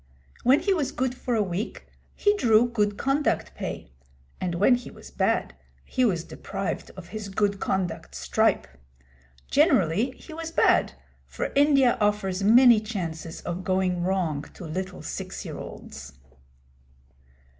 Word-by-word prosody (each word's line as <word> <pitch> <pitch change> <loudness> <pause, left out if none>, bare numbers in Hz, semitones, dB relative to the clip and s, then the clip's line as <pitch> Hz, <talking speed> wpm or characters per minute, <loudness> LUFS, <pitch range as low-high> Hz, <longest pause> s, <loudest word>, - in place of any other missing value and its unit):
When 260 +4 +4
he 395 - +2
was 305 -7 -1
good 255 -1 -1
for 250 -1 -2
a 215 - +2
week, 190 +3 -4 0.3
he 410 0 +2
drew 235 - +4
good 210 -4 0
conduct 275 +2 0
pay; - - -6 0.5
and 175 -2 -2
when 205 +8 +4
he 245 0 -2
was - - -13
bad, - - 0 0.3
he 255 - 0
was 175 -7 +1
deprived 195 +2 -5
of 175 -2 -10
his 215 -2 -6
good 200 0 0
conduct 185 -4 -2
stripe. - - +1 0.9
Generally 255 - +3
he 320 - -12
was 325 0 -5
bad, 330 - +3 0.3
for - - -4
India 275 -4 +4
offers 205 -2 0
many 235 +2 +7
chances 170 -7 -5
of 175 +1 -4
going 185 -1 0
wrong 175 -5 0
to 180 - -9
little 185 +4 -5
six - - -6
year - - -6
olds. 65 -1 -9
205 Hz, 145 wpm, -26 LUFS, 185-255 Hz, 0.9 s, many